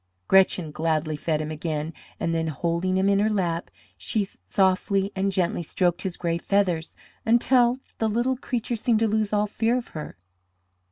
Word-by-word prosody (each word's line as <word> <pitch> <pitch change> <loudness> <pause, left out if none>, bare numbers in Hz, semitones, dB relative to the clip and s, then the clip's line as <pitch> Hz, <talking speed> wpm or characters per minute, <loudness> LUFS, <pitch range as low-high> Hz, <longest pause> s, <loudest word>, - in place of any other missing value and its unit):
Gretchen 185 -4 +4
gladly 155 0 0
fed 155 +1 -1
him 155 0 -4
again, 155 0 -3 0.3
and 165 - -1
then, 165 0 0
holding 170 +4 -1
him 190 +1 +2
in 200 0 +3
her 210 +2 +3
lap, 175 -5 -1 0.3
she 210 -3 -2 0.2
softly 195 -1 +2
and 195 +1 0
gently 180 -2 0
stroked 175 +1 0
his 185 -3 -4
gray 170 -1 -1
feathers 180 -4 0 0.3
until 240 +2 +4 0.2
the 220 - +1
little 240 +4 +1
creature 245 -2 -3
seemed 225 -1 +1
to 225 - +4
lose 215 -1 0
all 210 0 +2
fear 225 +3 0
of 245 - -5
her. 150 - -7
190 Hz, 170 wpm, -25 LUFS, 165-215 Hz, 0.3 s, Gretchen